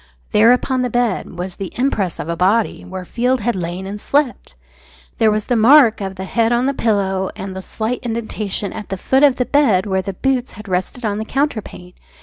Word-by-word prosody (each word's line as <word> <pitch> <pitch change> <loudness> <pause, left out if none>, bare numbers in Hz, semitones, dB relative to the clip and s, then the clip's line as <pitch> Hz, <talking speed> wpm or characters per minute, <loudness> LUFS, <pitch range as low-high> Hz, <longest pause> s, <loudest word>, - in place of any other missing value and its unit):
There, 225 +3 +6
upon 255 +1 +1
the 250 - 0
bed, 235 -6 -1
was 180 +1 -5
the 195 -2 -5
impress 215 - 0
of - - -5
a 170 - -2
body, 200 +6 +1
where 185 0 -7
Field 250 +4 0
had 240 +1 0
lain 180 +1 -4
and 205 +1 -6
slept. 275 - -1 0.6
There 220 - +5
was 215 0 0
the 245 - 0
mark 235 -1 +6
of 190 -1 -4
the 190 +1 -6
head 230 +3 +1
on 240 +1 +2
the 275 - +1
pillow, 195 -6 0
and 190 0 -6
the 190 - -5
slight 225 +5 -3
indentation 220 -4 -3
at 210 - -8
the 195 - -3
foot 265 +8 +1
of 285 -3 +6
the 250 - 0
bed 240 -11 +3
where 190 -2 0
the 195 +1 -5
boots 260 +4 -1
had 210 0 -11
rested 185 +6 -2
on 205 -1 -1
the 220 - -3
counterpane. 220 -10 -3
215 Hz, 215 wpm, -19 LUFS, 190-245 Hz, 0.6 s, There